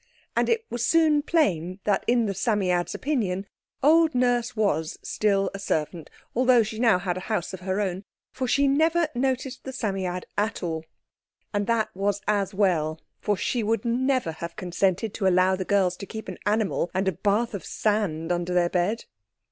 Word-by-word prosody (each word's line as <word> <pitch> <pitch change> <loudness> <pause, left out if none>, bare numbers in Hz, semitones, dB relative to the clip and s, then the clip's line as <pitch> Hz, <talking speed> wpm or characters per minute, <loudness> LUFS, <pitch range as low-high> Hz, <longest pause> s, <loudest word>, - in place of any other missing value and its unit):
And - - +2
it 460 -1 +1
was 240 -1 -2
soon 315 0 +4
plain 185 - +1
that 205 -2 +1
in 240 -1 +3
the 200 - -1
Psammead's 190 -4 0
opinion 205 -10 -1 0.4
old 320 0 +5
Nurse 245 -1 +1
was 160 -8 0
still 200 -2 +1
a 195 - -6
servant, 160 -3 -2 0.3
although 250 -1 +5
she 215 +1 -6
had - - -3
now 230 -5 +5
a 180 0 -2
house 195 -2 -3
of 190 - -6
her 190 +2 -2
own, 190 -1 -2 0.3
for 260 -1 -3
she 280 +3 +3
never 320 +3 +3
noticed 260 +1 -2
the 265 - -6
Psammead 190 -7 -2 0.2
at 210 -1 -1
all. 160 -2 -3 0.7
And 205 0 0
that 230 -2 +1
was 200 +1 0
as 205 -2 +1
well, 165 -6 +1 0.2
for 205 -2 0
she 245 - -1
would 225 +3 0
never 255 -4 +1
have 170 +1 -7
consented 190 +3 0
to 195 - 0
allow 185 +1 +4
the 185 0 -4
girls 190 -2 +2
to 200 - -8
keep 220 -1 -7
an 185 - -7
animal 210 -4 +1
and 190 +1 +1
a - - +4
bath 210 +6 0
of 200 - -5
sand 185 -7 -1
under 175 +1 -1
their 175 -1 +3
bed. 185 +6 0
205 Hz, 185 wpm, -25 LUFS, 180-240 Hz, 0.7 s, old